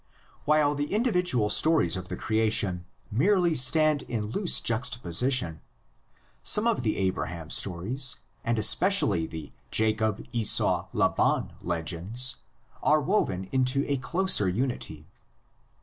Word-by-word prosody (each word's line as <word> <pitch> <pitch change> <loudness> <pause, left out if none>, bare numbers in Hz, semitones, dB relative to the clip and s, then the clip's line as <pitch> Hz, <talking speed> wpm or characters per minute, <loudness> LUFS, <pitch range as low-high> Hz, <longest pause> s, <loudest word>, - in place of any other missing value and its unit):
While 150 -1 +3
the 145 0 -4
individual 180 - +1
stories 155 - +2
of 90 -1 -6
the - - -5
creation 105 -5 0 0.3
merely 175 - +2
stand 155 +2 +3
in 110 -3 -4
loose 190 - +2
juxtaposition, 120 - 0 0.8
some 210 - +2
of 230 - +1
the 110 -3 -1
Abraham 85 -4 -3
stories 110 +9 -1 0.3
and 115 0 -1
especially 110 - +3
the 80 -3 -9 0.2
Jacob 110 -1 0
Esau 115 -4 +1
Laban - - 0
legends 90 +9 -1 0.4
are 155 +1 +3
woven 135 - -1
into 130 +1 +1
a 140 - 0
closer 165 - +1
unity. 95 - -4
120 Hz, 115 wpm, -27 LUFS, 95-150 Hz, 0.8 s, While